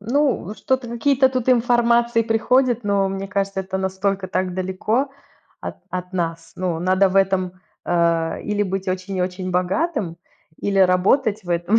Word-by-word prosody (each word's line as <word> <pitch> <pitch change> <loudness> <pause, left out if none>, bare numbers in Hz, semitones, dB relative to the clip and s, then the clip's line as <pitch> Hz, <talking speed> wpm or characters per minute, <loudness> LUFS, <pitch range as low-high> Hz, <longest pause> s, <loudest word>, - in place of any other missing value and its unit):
Ну, 265 +6 +1
вот 210 +4 -8
что-то 260 -2 -1
какие-то 265 +3 +3
тут 255 -1 -2
информации 235 -1 +3
приходят, 240 +1 +2
но 200 -1 +2
мне 195 0 -4
кажется, 195 -1 -1
это 190 0 -4
настолько 190 0 -1
так 185 0 -1
далеко 190 +8 -1 0.5
от - - -6
от 180 0 -5
нас. 165 -2 -3
Ну, 180 -3 -1
надо 185 +2 +3
в 190 - -2
этом, 185 -1 +1 0.2
э, 170 -1 +1
или 210 0 0
быть 190 0 -3
очень-очень 185 0 -2
богатым, 185 - -1 0.4
или 195 -1 0
работать 190 +4 +3
в 175 - -7
этом. 175 +6 +2
195 Hz, 155 wpm, -21 LUFS, 185-230 Hz, 0.5 s, какие-то